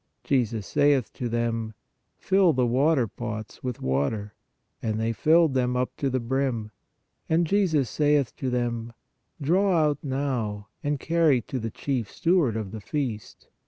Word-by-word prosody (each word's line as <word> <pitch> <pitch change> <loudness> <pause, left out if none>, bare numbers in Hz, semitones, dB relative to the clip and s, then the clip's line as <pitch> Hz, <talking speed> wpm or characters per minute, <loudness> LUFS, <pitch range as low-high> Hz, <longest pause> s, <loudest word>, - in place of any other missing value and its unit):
Jesus 115 -6 0
saith 145 -2 +2
to 120 - -4
them: 115 -1 -2 0.4
Fill 190 -3 +3
the 125 -1 +2
waterpots 120 -5 -1
with 125 -3 -4
water. 70 +11 -1 0.5
And 110 -1 -1
they 115 +1 0
filled 160 +6 +4
them 125 -1 +1
up 125 0 -1
to 140 - 0
the 130 0 0
brim. 120 -3 -1 0.6
And 165 +2 +3
Jesus 165 -7 +2
saith 145 +1 +1
to 130 - -2
them: 120 -2 -2 0.5
Draw 180 +5 +2
out 150 -2 +2
now, 125 -7 -2
and 145 -1 -1
carry 165 -5 +3
to 130 - -4
the 115 0 -3
chief 125 -4 -3
steward 165 - +2
of 105 -4 -4
the 110 -1 -7
feast. 120 - -4
125 Hz, 150 wpm, -26 LUFS, 115-145 Hz, 0.6 s, filled